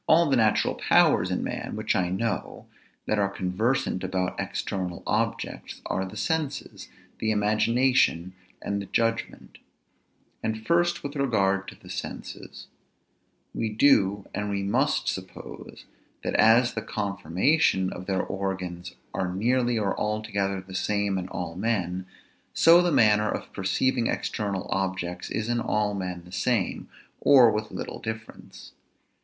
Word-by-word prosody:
All 165 +1 +5
the - - +5
natural 110 -3 +3
powers - - +3
in - - -1
man, - - -4
which - - -1
I 90 -1 +1
know, 95 +1 -3 0.4
that 110 - 0
are 100 -1 +2
conversant 100 +2 -1
about 95 -1 -1
external 90 -3 -3
objects, - - -2
are 95 - -1
the 95 - -9
senses; 155 -4 -3 0.3
the 110 - 0
imagination; 110 -3 +2 0.3
and 100 0 -2
the 100 - -8
judgment. 115 +2 -2 0.8
And 110 0 -3
first 175 +1 +2
with 145 +1 -5
regard 100 -8 +1
to - - -8
the - - -13
senses. - - -7 0.9
We 115 - -1
do 105 -4 +3
and 105 +1 -2
we 100 -1 -1
must 100 - +1
suppose, - - -6 0.4
that - - -2
as 120 +2 +5
the 110 - -3
conformation 100 - +1
of 90 - -8
their 95 -2 0
organs 90 -2 -4 0.2
are 90 -1 -1
nearly 120 +5 +1
or 100 -3 0
altogether 105 -2 -1
the 95 0 -12
same 100 0 0
in 90 - -5
all 90 -3 -5
men, 95 -2 -2 0.5
so 170 +2 +7
the 175 -1 +1
manner 105 -5 +4
of - - -5
perceiving 115 +6 +1
external 100 -3 -2
objects 95 -2 -2
is 110 -1 -2
in 120 0 0
all 105 -2 0
men 90 -3 -4
the 90 - -14
same, 95 +2 -1 0.3
or 125 -5 +7
with 105 0 -2
little - - -6
difference. 110 0 -8
105 Hz, 140 wpm, -26 LUFS, 95-115 Hz, 0.9 s, so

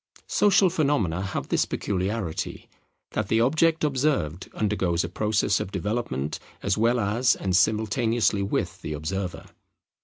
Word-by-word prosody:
Social 195 -3 +4
phenomena 140 - +1
have 100 +1 -4
this - - +2
peculiarity, 95 -2 -3 0.4
that - - -2
the 110 - +2
object 160 +7 +3
observed 130 - 0
undergoes 95 -5 0
a 85 - -4
process 105 +1 +1
of 95 - -4
development 95 - -2 0.2
as 100 -1 +1
well 115 +3 +2
as 115 +4 +2
and 95 -2 -1
simultaneously 110 +1 +2
with 95 -1 -2
the 75 - -4
observer. 90 +4 -4
105 Hz, 130 wpm, -25 LUFS, 95-120 Hz, 0.4 s, Social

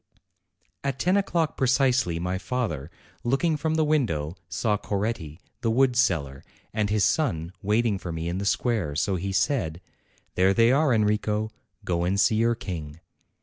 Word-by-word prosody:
At 135 -2 -1
ten 180 +7 +2
o'clock 170 -5 0
precisely 130 -8 +2
my 90 +2 -2
father, 100 - -3 0.3
looking 135 +7 +1
from 155 +1 -1
the 160 - +3
window, 100 - 0
saw 105 +5 0
Coretti, 100 -6 -3 0.2
the 115 - +1
wood 125 +2 +3
seller, 80 - +1 0.3
and 105 -1 0
his 105 -1 +2
son 90 - 0
waiting 105 0 +1
for 85 - -5
me 80 0 -4
in 90 +2 -2
the 100 - -3
square. 100 - 0
So 95 +6 0
he 95 +2 -3
said: 95 - 0 0.5
'There 95 +2 +3
they 115 +1 +5
are, 140 +1 +3
Enrico; 105 -1 +1 0.3
go 85 -3 0
and 95 +3 0
see 105 +3 +3
your 115 +1 +2
King." 80 -7 -6
105 Hz, 160 wpm, -26 LUFS, 85-125 Hz, 0.5 s, they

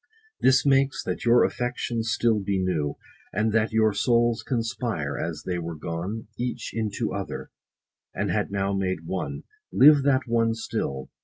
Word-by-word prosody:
This 130 +1 +4
makes, 135 -1 +3
that - - -4
your 120 +1 +6
affections 120 -2 -2
still 115 -2 +2
be 100 0 -1
new, 85 -6 -1 0.4
And 110 +3 0
that 110 0 +2
your 110 -1 +3
souls 120 0 +2
conspire, 115 - -2
as 80 0 -4
they 90 -1 -2
were 85 -1 -5
gone 85 +8 -4
110 - - 0
Each 125 - -4
into 110 -3 -2
other, - - -5 0.6
and - - -2
had - - 0
now 100 0 -1
made 95 -4 -2
one. 95 +2 -4 0.3
Live 145 +1 +7
that 135 -1 +3
one 115 -1 +1
still 70 -11 -4
110 Hz, 160 wpm, -25 LUFS, 95-120 Hz, 0.6 s, Live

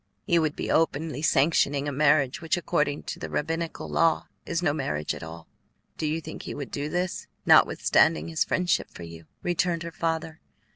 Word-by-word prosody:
"He 170 -4 +3
would 155 -2 0
be - - -3
openly 155 -2 +1
sanctioning 145 -1 +2
a - - -1
marriage 140 -1 +2
which 165 +1 0
according 150 -3 0
to - - -6
the - - -5
rabbinical 165 +2 -3
law 165 -1 +2 0.2
is 170 +1 -1
no 145 - +2
marriage 75 - -2
at - - -8
all. 80 +1 -9 0.5
Do 155 - -2
you 155 +2 -1
think 160 - -8
he - - -6
would 140 -2 -6
do 145 +1 -3
this, 180 +2 -2 0.2
notwithstanding 80 0 +4
his 80 -1 +1
friendship 180 -2 0
for 85 - -11
you?" 85 -1 -11 0.2
returned 175 -1 0
her 170 - -6
father. 165 -1 -3
155 Hz, 185 wpm, -26 LUFS, 140-165 Hz, 0.5 s, notwithstanding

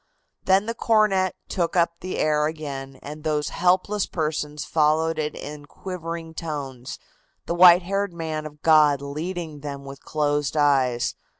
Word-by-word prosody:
Then 190 +2 +4
the 230 - -2
cornet 210 -5 +2
took 170 -2 -1
up 170 -1 +2
the 185 - -5
air 150 -1 +2
again 140 -4 -6
and 150 +1 -8
those 150 -2 0
helpless 185 +3 +1
persons 150 -2 -3
followed 160 +1 +2
it 150 0 -2
in 145 0 -8
quivering 165 -2 -6
tones, 140 -6 -6 0.5
the - - -2
white 175 0 +8
haired 200 +1 -1
man 160 -2 -4
of 150 0 -16
God 150 -3 +5
leading 155 +2 -5
them 140 -1 -7
with 135 0 -10
closed 150 -1 -1
eyes. 130 -5 +2
155 Hz, 145 wpm, -24 LUFS, 145-175 Hz, 0.5 s, white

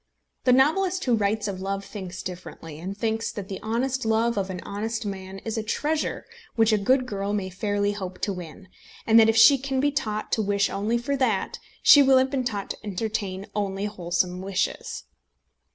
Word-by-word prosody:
The 255 - +5
novelist 355 +9 +3
who 250 - +2
writes 215 0 0
of 190 -2 -4
love 195 +1 -3
thinks 190 -3 -7
differently, 170 -4 -8
and 190 +4 -6
thinks 225 0 -1
that 200 -2 -7
the 195 - -5
honest 255 +4 -1
love 225 +1 +2
of 195 -1 -1
an 185 -1 -5
honest 220 +2 -4
man 190 -1 -6
is 225 0 -2
a - - -1
treasure 300 +8 -2 0.3
which 225 -1 +4
a - - +4
good 255 +6 +2
girl 200 -3 -3
may 190 -2 -2
fairly 205 +2 0
hope 185 -3 -6
to 200 - 0
win, 180 +2 -9 0.4
and 225 0 +6
that 225 0 +6
if 225 - +2
she 275 +5 +8
can 270 0 -2
be 290 +2 +2
taught 215 -6 -3
to 220 - +2
wish 200 -1 +1
only 215 +4 0
for 280 +4 -2
that, 235 -7 0 0.2
she 290 - +9
will 270 -1 +6
have 260 0 +2
been 270 -2 0
taught 205 -5 -3
to - - -6
entertain 200 -1 -3
only 200 -1 -2
wholesome 180 -2 -1
wishes. 195 0 -2
210 Hz, 200 wpm, -25 LUFS, 195-235 Hz, 0.4 s, she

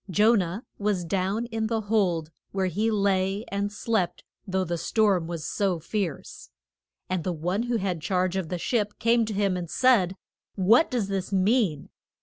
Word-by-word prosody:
Jo 210 +6 +4
nah 190 -1 0 0.2
was 200 -4 0
down 195 +5 -1
in 220 -1 -1
the 225 0 -1
hold, 185 -7 0 0.2
where 195 -1 0
he 205 +5 0
lay 200 0 +1
and 200 +1 -2
slept, 210 -3 -1 0.2
though 190 0 0
the 175 -1 -2
storm 200 -6 +2
was 165 -3 -5
so 195 -4 0
fierce. 180 -1 -4 0.6
And 185 -3 -2
the 185 - -1
one 175 +5 -1
who 240 - +2
had 185 -5 -2
charge 185 +1 0
of 185 -4 -2
the 180 - -2
ship 210 +2 -1
came 230 0 +3
to 215 - -4
him 200 -2 +1
and 175 -2 -4
said, 205 -8 +3 0.4
What 215 - +4
does 235 -6 -1
this 195 -1 -3
mean? 195 - +1
195 Hz, 175 wpm, -26 LUFS, 180-215 Hz, 0.6 s, Jo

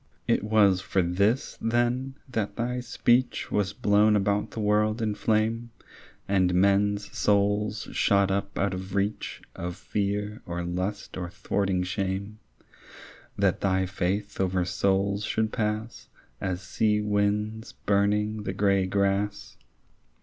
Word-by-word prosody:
It - - +2
was 105 -4 +4
for 95 0 +1
this 100 +8 0
then, 120 +3 0
that 105 -5 -2
thy 125 +1 -2
speech 125 0 +1
Was 100 -1 +1
blown 105 +1 +3
about 100 0 +1
the - - -7
world 105 +1 +2
in 110 -2 0
flame 110 +2 0 0.6
And 95 -2 +2
men's 100 +2 +2
souls 105 +1 +1
shot 100 -1 +3
up 100 +1 -2
out 100 -1 +1
of 95 +1 -6
reach 100 +2 -2
Of 90 0 -4
fear 105 +2 -2
or 85 0 -3
lust 90 +4 -3
or 90 -1 -4
thwarting 95 0 -1
shame— 95 +3 -3 1.0
That - - +1
thy 95 -1 +2
faith 95 +2 -2
over 90 -1 +1
souls 100 +2 +1
should 110 +1 -1
pass 110 +1 -3 0.3
As 95 0 -2
sea 105 +4 +1
winds 105 +2 -1
burning 105 +1 +1
the 95 - -3
grey 100 -1 +2
grass? 100 +1 -1
100 Hz, 130 wpm, -27 LUFS, 95-105 Hz, 1.0 s, was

